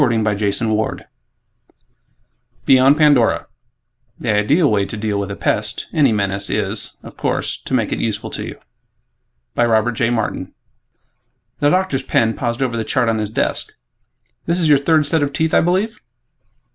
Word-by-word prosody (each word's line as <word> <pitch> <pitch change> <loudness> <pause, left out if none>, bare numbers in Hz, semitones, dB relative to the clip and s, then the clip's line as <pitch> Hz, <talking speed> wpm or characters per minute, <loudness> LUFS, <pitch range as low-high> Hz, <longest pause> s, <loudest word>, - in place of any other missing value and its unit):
net 110 -2 0 1.6
Beyond 135 +2 +5
Pandora 145 -7 +3 0.7
The - - -1
ideal 140 - +3
way 100 -2 +2
to 100 +3 -5
deal 105 -1 -2
with 100 0 -3
a 100 - -5
pest 110 +3 -2
any 145 -7 +3
menace 100 -2 0
is, 105 0 -2
of - - -11
course, - - -1
to - - -7
make - - 0
it - - -2
useful - - -3
to - - -4
you.... - - -7 1.0
by - - +1
Robert 115 0 +2
J. 115 +1 0
Martin 110 -5 -3 1.0
The 145 - +3
doctor's 180 -6 +1
pen 115 -3 +1
paused 120 +2 -2
over 125 -3 -2
the 115 - -1
chart 115 +2 0
on 110 -1 0
his 105 -1 -2
desk, 110 - -2 0.7
"This 170 +1 +2
is 165 - +2
your 145 -2 +5
third 155 +1 +2
set 155 +2 +2
of 145 -1 -1
teeth, 160 0 0
I - - +5
believe?" 190 +6 0
115 Hz, 160 wpm, -18 LUFS, 105-145 Hz, 1.6 s, Beyond